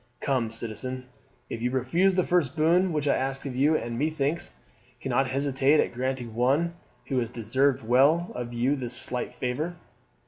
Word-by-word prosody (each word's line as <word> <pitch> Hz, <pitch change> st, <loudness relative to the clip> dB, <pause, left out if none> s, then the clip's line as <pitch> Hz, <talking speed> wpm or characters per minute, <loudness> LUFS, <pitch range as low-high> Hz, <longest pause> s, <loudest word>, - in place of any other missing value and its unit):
Come, 130 Hz, -5 st, 0 dB
citizen, 120 Hz, +3 st, -4 dB, 0.4 s
you 115 Hz, +2 st, -2 dB
refused 150 Hz, +10 st, +2 dB
the 185 Hz, -, +3 dB
first 170 Hz, -8 st, +1 dB
boon 170 Hz, +4 st, +3 dB
which 150 Hz, -2 st, -1 dB
I -, -, +4 dB
asked 135 Hz, +1 st, -2 dB
you, 140 Hz, +4 st, +2 dB
and, 115 Hz, 0 st, -4 dB
methinks, 155 Hz, +1 st, -1 dB, 0.5 s
cannot 135 Hz, -1 st, 0 dB
hesitate 140 Hz, +2 st, +2 dB
at -, -, +1 dB
granting 125 Hz, -2 st, -3 dB
one 140 Hz, +9 st, +2 dB, 0.4 s
who 130 Hz, -2 st, +1 dB
has 120 Hz, -2 st, -2 dB
deserved 130 Hz, +4 st, +1 dB
well 145 Hz, +8 st, +4 dB
of 120 Hz, -1 st, -5 dB
you 120 Hz, +4 st, +1 dB
this 125 Hz, -3 st, -1 dB
slight 125 Hz, -1 st, -2 dB
favour." 150 Hz, +8 st, -3 dB
135 Hz, 160 wpm, -27 LUFS, 125-155 Hz, 0.5 s, I